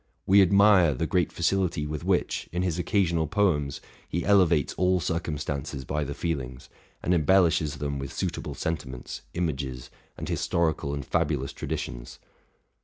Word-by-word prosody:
We 100 +1 +6
admire 95 -4 +5
the 80 - -1
great 90 0 +1
facility 85 -3 0
with 75 -1 -4
which, - - 0
in 90 +2 -1
his 90 -2 -1
occa 100 +2 +2
sional 80 -2 0
poems, 75 -9 +1 0.3
he 85 - -2
elevates 90 -7 +4
all 90 0 +2
circumstances 75 -5 -3
by 75 +3 -1
the 70 +1 -5
feelings, 65 -7 -4 0.3
and 90 - +2
embellishes 80 -2 +3
them 70 -1 -3
with 70 0 -5
suitable - - -3
sentiments, 65 -6 -4
images, 70 -7 -3 0.3
and - - -5
historical 80 -4 0
and 70 -1 -5
fabulous 75 -5 -1
traditions. - - -5
80 Hz, 145 wpm, -27 LUFS, 70-90 Hz, 0.3 s, We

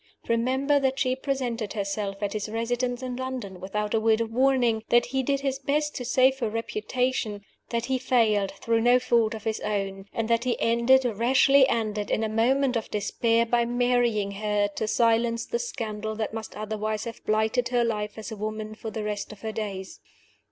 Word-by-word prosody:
Remember 260 +5 +2
that 265 -1 0
she 255 -2 +1
presented 250 -6 -2
herself 200 -1 -3
at 200 - -1
his 215 0 -3
residence 245 +3 -2
in 250 -1 -4
London 255 -8 -5
without 210 +3 -3
a 225 - +3
word 220 0 +3
of 225 -1 -2
warning; 250 -3 +3
that 240 0 +5
he 265 +2 -1
did 275 +1 0
his 270 -1 -1
best 295 +2 0
to 250 - -4
save 260 +2 +3
her 230 -4 0
reputation; 230 -1 -2 0.3
that 235 0 -1
he 260 0 0
failed, 220 -6 +2
through 225 +3 0
no 245 +2 +5
fault 235 -3 +2
of 215 - -8
his 220 -1 -1
own; 195 -2 -3
and 225 -1 -2
that 230 0 +2
he 250 -2 -1
ended, 235 +3 +4
rashly 260 +4 +4
ended 215 -2 -1
in 220 - +1
a 220 - 0
moment 250 +4 +2
of 225 - -2
despair, 230 +3 +1
by 235 +1 +2
marrying 240 -4 +1
her, 205 0 0
to 220 - -2
silence 230 0 +2
the 475 - -2
scandal 220 - -4
that 215 0 -3
must 220 -1 -6
otherwise 215 0 -3
have 230 -1 -8
blighted 220 +3 +1
her 245 -1 +2
life 210 -2 -2
as 220 +1 -7
a - - -4
woman 215 +1 -4
for 220 +1 -7
the 220 -1 -4
rest 210 0 -3
of 210 -2 -12
her 220 - -3
days. 200 -3 -5
230 Hz, 195 wpm, -26 LUFS, 215-250 Hz, 0.3 s, that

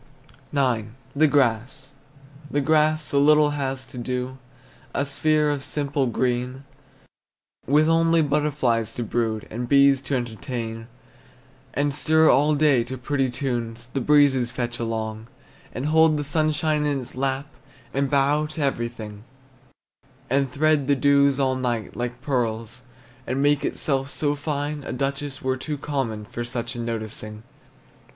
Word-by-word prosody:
IX. 125 -6 +1 0.3
THE 155 +2 +5
GRASS. 130 -1 0 0.6
The 145 - 0
grass 155 +1 +2
so 140 -1 +1
little 150 0 +5
has 135 -2 -3
to 125 - -9
do, 125 +2 -3 0.6
A 140 - +1
sphere 150 +2 +2
of 140 -2 -3
simple 140 -2 -1
green, 125 +2 -1 1.0
With 150 +3 +4
only 165 0 +4
butterflies 140 -6 0
to 120 - -2
brood, 110 -1 -2
And 120 +2 -4
bees 140 -1 +5
to 135 0 -2
entertain, 115 -1 -4 0.9
And 145 0 +1
stir 160 +2 +4
all 150 +2 +3
day 145 -5 +4
to 130 +2 -6
pretty 135 +1 0
tunes 120 -2 -3
The 135 - -1
breezes 140 -3 +4
fetch 120 -1 -4
along, 110 -1 -3 0.4
And 130 - -4
hold 160 0 +4
the 145 - -2
sunshine 150 0 +1
in 140 -2 0
its 125 - -11
lap 135 +1 -1 0.5
And 140 0 0
bow 145 +2 +2
to 155 +1 -5
everything; 115 -5 -3 1.1
And 135 -1 +2
thread 150 0 +2
the 140 - +4
dews 140 0 +3
all 130 -1 +2
night, 120 -4 -2
like 120 +1 -4
pearls, 120 -2 -2 0.4
And 130 - -1
make 145 0 +2
itself 135 -2 -1
so 145 0 0
fine, 145 0 -3
A - - -5
duchess 135 +2 -3
were 130 0 0
too 150 +3 -4
common 130 -7 -3
For 120 +2 -5
such 120 0 -4
a 120 - -7
noticing. 110 -2 -4
135 Hz, 145 wpm, -24 LUFS, 120-145 Hz, 1.1 s, THE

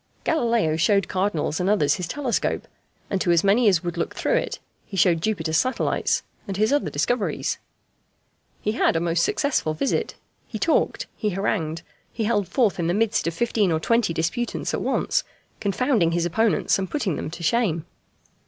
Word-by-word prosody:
Galileo 230 - +1
showed 200 +2 +3
cardinals 185 -5 -1
and 180 +2 +1
others 150 -9 +3
his 180 -3 -3
telescope, 265 +2 -1 0.4
and 195 -2 0
to - - 0
as 170 -1 +4
many 210 +4 +4
as 185 -3 +3
would 175 0 -4
look 170 - -2
through - - 0
it - - 0 0.3
he 195 - -8
showed 170 -2 +4
Jupiter's 160 -6 0
satellites 255 +7 0 0.2
and 195 -1 -4
his 215 +6 +2
other 290 - +1
discoveries. 245 -4 -1 1.0
He 210 - +1
had 220 - +2
a - - +2
most 170 0 +1
successful 260 - 0
visit. 270 - -1 0.3
He 220 - -5
talked, 325 +9 +1
he 210 - -1
harangued, 170 -4 -2 0.3
he 225 - -3
held 210 -3 +1
forth 230 -8 +1
in 165 - 0
the 175 - +1
midst 220 -3 +1
of 165 - -2
fifteen 220 -4 +1
or 160 - +1
twenty 230 +2 +2
disputants 165 +9 -2
at - - -1
once, - - 0 0.4
confounding 205 - +1
his 170 0 +1
opponents 220 +4 +2
and 190 - -3
putting 210 - -1
them - - -4
to 170 +2 -8
shame. 170 -5 +1
195 Hz, 180 wpm, -24 LUFS, 170-230 Hz, 1.0 s, as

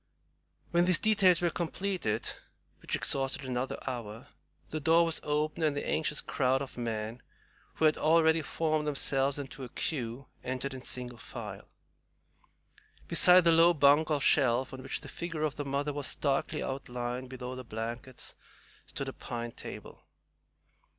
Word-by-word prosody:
When 175 0 +4
these 180 -2 +4
details 190 -2 +4
were 175 -1 +2
completed, 170 - -2 0.5
which - - -1
exhausted 135 0 -1
another 125 0 -2
hour, 120 0 -6 0.4
the 155 - -2
door 165 +3 +4
was 165 -1 -1
opened, 150 +2 -1
and 150 -2 +1
the - - -3
anxious 150 -2 0
crowd 130 0 +1
of 135 -1 -7
men, 115 0 -4 0.5
who 160 - +2
had 155 - +4
already 160 0 +4
formed 155 0 -1
themselves 135 -1 +2
into 135 -1 -7
a 125 - -7
queue, 125 -2 -3 0.2
entered 130 +2 -3
in 130 -1 -8
single 125 -2 -4
file. - - -8 1.4
Beside 180 0 +7
the 170 - +5
low 165 +1 +6
bunk 145 +2 +5
or 150 -2 +2
shelf, 130 -2 +3
on 130 - -7
which 130 - -3
the - - -9
figure 165 -3 -4
of 150 -3 0
the 145 - -4
mother 140 +2 -1
was 145 -1 -2
starkly 140 -2 0
outlined 125 -1 -4
below 125 0 -6
the 130 0 -7
blankets, 115 +3 -5 0.5
stood - - -5
a - - -4
pine 120 -1 -5
table. - - -9
140 Hz, 155 wpm, -30 LUFS, 125-160 Hz, 1.4 s, Beside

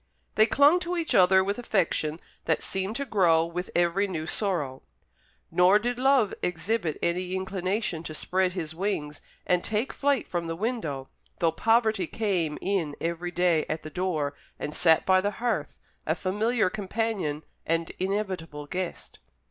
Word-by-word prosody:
They 215 +1 +5
clung 285 +8 +5
to 355 0 -3
each 330 -2 -1
other 190 0 +6
with 200 +4 -2
affection 170 -8 0 0.3
that 160 - +1
seemed 190 +3 -1
to 280 - -2
grow 175 -8 +3
with 180 +2 -5
every 175 +4 +2
new 160 -5 -4
sorrow; 160 -9 -1 0.7
nor 180 +3 +6
did 240 +3 -2
love 260 -5 +3
exhibit 180 -1 -1
any 180 +2 0
inclination 190 -1 -2
to 155 - -5
spread 185 +2 0
his 160 -4 -4
wings 160 -5 -3 0.2
and 180 -1 +2
take 220 +4 -1
flight 280 -3 +1
from 170 -1 -3
the 165 - -3
window, 165 - -3 0.3
though 165 -1 +2
poverty 220 -3 +2
came 180 -9 -1
in 180 -7 -1
every 170 +1 -2
day 175 -3 +2
at 155 +1 -3
the 155 - -8
door, 160 -6 -1 0.2
and 150 - -5
sat 160 -1 +4
by 185 0 +5
the 205 +2 -1
hearth, 240 0 -2 0.3
a - - +2
familiar 215 +3 +1
companion 205 -7 -2 0.2
and 165 0 -1
inevitable 185 -6 -3
guest. 180 +4 -5
185 Hz, 155 wpm, -27 LUFS, 165-215 Hz, 0.7 s, other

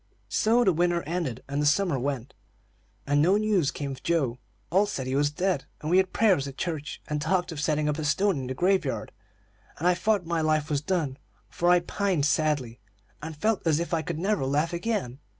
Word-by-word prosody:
"So 230 +3 +3
the 190 - +3
winter 175 +1 +1
ended, 155 -7 -3
and 140 +1 -2
the - - +1
summer 165 -2 +2
went, 135 -1 -3 0.7
and 145 +1 +2
no 185 +6 +4
news 210 -9 +2
came 140 0 -4
of 130 -1 -8
Joe. 140 -8 0 0.3
All 195 +4 +3
said 135 -10 -4
he 130 - -3
was 145 +1 +3
dead, 180 0 -1
and 155 - -4
we 180 - +5
had 190 -1 +3
prayers 190 -11 +3
at 140 - -9
church, 155 -4 -4
and 150 -1 -2
talked 175 +3 0
of 150 -2 -5
setting 150 0 +1
up 150 +1 -1
a - - -2
stone 190 +2 +1
in 130 - -5
the 130 - -4
grave 185 +4 +2
yard, 135 - -4 0.7
and 170 - 0
I 180 - +5
thought 205 0 0
my 165 -1 -1
life 155 -1 +1
was 145 -1 +1
done; 150 -5 -1 0.3
for 175 - +1
I 180 0 +5
pined 185 -4 0
sadly, 145 -6 0 0.4
and 160 0 -7
felt 215 +5 +1
as 155 -1 +3
if 170 0 -3
I 165 - +2
could 160 +1 -4
never 195 -1 0
laugh 150 +5 0
again. 170 - -2
160 Hz, 220 wpm, -27 LUFS, 145-180 Hz, 0.7 s, we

